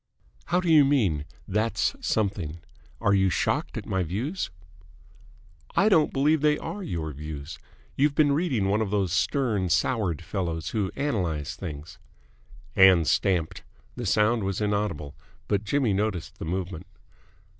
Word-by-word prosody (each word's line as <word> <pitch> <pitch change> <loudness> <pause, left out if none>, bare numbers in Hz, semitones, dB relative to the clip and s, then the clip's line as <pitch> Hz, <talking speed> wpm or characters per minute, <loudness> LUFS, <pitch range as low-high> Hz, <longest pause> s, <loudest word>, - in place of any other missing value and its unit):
"How 175 +1 +1
do 180 - -3
you 155 -3 +7
mean 105 - +1 0.2
that's 110 +4 0
something? 95 -7 -1 0.4
Are 100 - +2
you 95 -1 +3
shocked 85 - -1
at - - -5
my 95 - -1
views?" 115 - -3 1.3
"I 210 - +4
don't 160 -7 +4
believe 145 +2 +2
they 150 0 +3
are 205 - -6
your 80 - -4
views. 75 +1 -7 0.4
You've 145 +1 +2
been 150 -2 +4
reading 140 - +1
one 105 +3 +1
of 110 - -1
these 100 -3 0
stern, 110 - +1
soured 95 - 0
fellows 85 -3 -3
who 105 -4 -1
analyse 90 - -2
things." 75 -4 -8 0.8
Ann 95 -3 +7
stamped. 90 -1 +1 0.3
The 120 -3 -4
sound 105 +3 +2
was 95 -1 -2
inaudible, 100 -9 -1 0.3
but 100 0 0
Jimmy 125 -1 +1
noticed 100 -3 -2
the - - -5
movement. 90 0 -4
100 Hz, 145 wpm, -26 LUFS, 85-130 Hz, 1.3 s, you